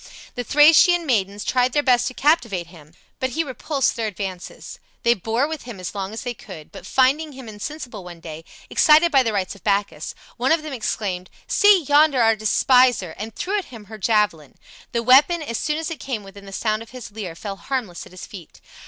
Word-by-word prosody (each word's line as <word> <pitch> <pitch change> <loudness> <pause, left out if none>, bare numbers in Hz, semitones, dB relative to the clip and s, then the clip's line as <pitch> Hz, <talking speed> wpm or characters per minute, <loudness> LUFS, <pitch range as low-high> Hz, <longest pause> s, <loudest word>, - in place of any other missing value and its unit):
The 245 - -4
Thracian 325 +6 +5
maidens 205 -6 0
tried 250 0 +1
their 290 - +2
best 245 -3 +3
to 255 - -5
captivate 235 - +1
him, 155 -1 -16 0.2
but 260 - -1
he 320 +6 -1
repulsed 275 0 -1
their 225 -2 -2
advances. 190 -3 -7 0.2
They 235 - +5
bore 225 +6 -1
with 315 -1 -5
him 235 -6 -8
as 180 - -6
long 195 -1 -4
as 220 - -6
they 245 -1 -3
could; 185 -9 -12
but 180 - -11
finding 280 +4 +2
him 260 -2 -10
insensible 220 0 -7
one 175 -1 -10
day, 160 -1 -9 0.2
excited 315 +2 +5
by 270 -3 +5
the 230 -3 0
rites 195 -3 -2
of 200 - -17
Bacchus, 200 -7 -1 0.2
one 255 +3 +1
of 320 -1 +2
them 305 -2 -6
exclaimed, 195 -6 -3 0.2
"See 410 -4 +5
yonder 290 -1 +4
our 225 -1 +4
despiser!" 220 -3 +3
and 220 +1 -6
threw 405 +3 -1
at 380 - -7
him 225 -4 -12
her 215 +1 -11
javelin. 200 - 0 0.4
The 235 0 -1
weapon, 290 +7 +5
as 230 -6 -4
soon 300 0 -1
as 325 +1 -4
it 325 - -6
came 245 -6 -4
within 200 0 -13
the - - -9
sound 215 +2 -1
of 230 - -11
his 250 -4 -10
lyre, 200 -6 -7
fell 195 +2 -6
harmless 225 -8 -4
at - - -18
his 185 - -9
feet. 180 -6 -12
230 Hz, 215 wpm, -22 LUFS, 200-275 Hz, 0.4 s, Thracian